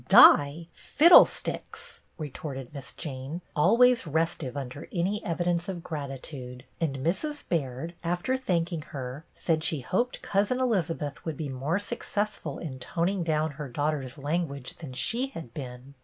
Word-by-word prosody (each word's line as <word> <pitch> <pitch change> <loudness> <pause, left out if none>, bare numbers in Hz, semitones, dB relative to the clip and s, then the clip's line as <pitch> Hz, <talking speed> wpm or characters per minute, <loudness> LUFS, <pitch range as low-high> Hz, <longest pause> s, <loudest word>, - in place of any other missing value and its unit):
"Die, 145 +4 +8
fiddlesticks!" 340 +4 +4 0.2
retorted 140 -4 -6
Miss 140 -1 -8
Jane, 145 +4 -6
always 230 +6 +5
restive 160 -3 -1
under 135 +1 -6
any 195 +3 0
evidence 175 +1 0
of 175 -3 -5
grat 150 -5 -4
itude; 130 -2 -8 0.2
and 150 -5 0
Mrs. 290 - -1
Baird, 145 0 -2
after 175 +9 0
thanking 170 -9 -1 0.2
her, 130 +4 -6
said 160 -2 0
she 160 -4 0
hoped 240 - -1
Cousin 205 +6 +1
Elizabeth 165 - -1
would 160 -4 -4
be 150 -3 -3
more 135 +7 -1
successful 205 -6 -3
in 135 -6 -6
toning 175 +8 -1
down 155 -2 +1
her 145 -1 -7
daugh 145 +5 0
ter's 135 -2 -5
language 145 -2 -2
than 150 -6 -8
she 240 - 0
had 165 - -9
been. 130 -1 -8
160 Hz, 145 wpm, -28 LUFS, 140-175 Hz, 0.2 s, Die